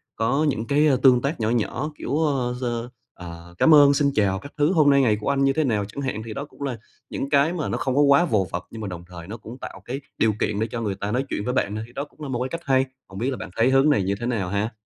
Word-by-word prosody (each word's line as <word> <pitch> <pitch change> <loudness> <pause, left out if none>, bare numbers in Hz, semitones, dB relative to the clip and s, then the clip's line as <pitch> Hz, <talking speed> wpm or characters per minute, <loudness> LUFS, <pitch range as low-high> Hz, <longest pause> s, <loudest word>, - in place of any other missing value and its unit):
có 130 +7 +1
những 115 -3 -3
cái 150 +2 +3 0.2
tương 125 -2 +6
tác 140 +5 -2
nhỏ 110 0 0
nhỏ, 120 +5 -1
kiểu, 140 - -2
ơ, 130 -4 0
giơ 120 -1 -3 0.2
ờ, 85 0 -10
"Cám 160 - +5
ơn", 145 -1 +7
"Xin 140 -1 +2
chào" 95 -3 +2
các 140 - -11
thứ, 150 +3 +3
"Hôm 155 -4 +5
nay 140 -1 +5
ngày 110 -5 +3
của 105 - -1
anh 140 -1 +2
như 135 0 +3
thế 155 - +1
nào?" 105 -7 0
chẳng 105 +7 -7
hạn. 130 -6 -3
Thì 110 - -6
đó 140 +5 -5
cũng 145 - -20
là 135 -4 -3 0.3
những 140 - -4
cái 145 +3 +3
mà 165 -4 -3
nó - - -1
không 130 -1 -1
có 145 - +4
quá 140 +3 +5
vồ 105 - +1
vập, 85 - -3
nhưng 115 - -8
mà 105 - -4
đồng 90 -2 -7
thời 85 -2 -10
nó 110 +4 -6
cũng 115 +4 -10
tạo - - -9
cái 135 +3 -5 0.2
điều 110 -1 +2
kiện 105 0 -1
để 110 - 0
cho 115 - -3
người 105 -4 -2
ta 100 +2 -4
nói 130 +4 0
chuyện - - -2
với 125 - -1
bạn 105 -5 0
thôi, 110 - -4
thì 120 - -19
đó 140 - -3
cũng 150 - -22
là 145 - -5
một 125 -2 -2
cái 130 - -2
cách 170 0 -5
hay. 135 -1 +3 0.2
Hông 95 - -9
biết 125 +4 0
là 130 - -4
bạn - - -7
thấy 115 +3 +4
hướng 135 +3 +4
này 135 -10 +3
như 100 +2 0
thế 120 - -4
nào 110 -7 -1
ha? 100 +3 -1
125 Hz, 315 wpm, -23 LUFS, 105-140 Hz, 0.3 s, ơn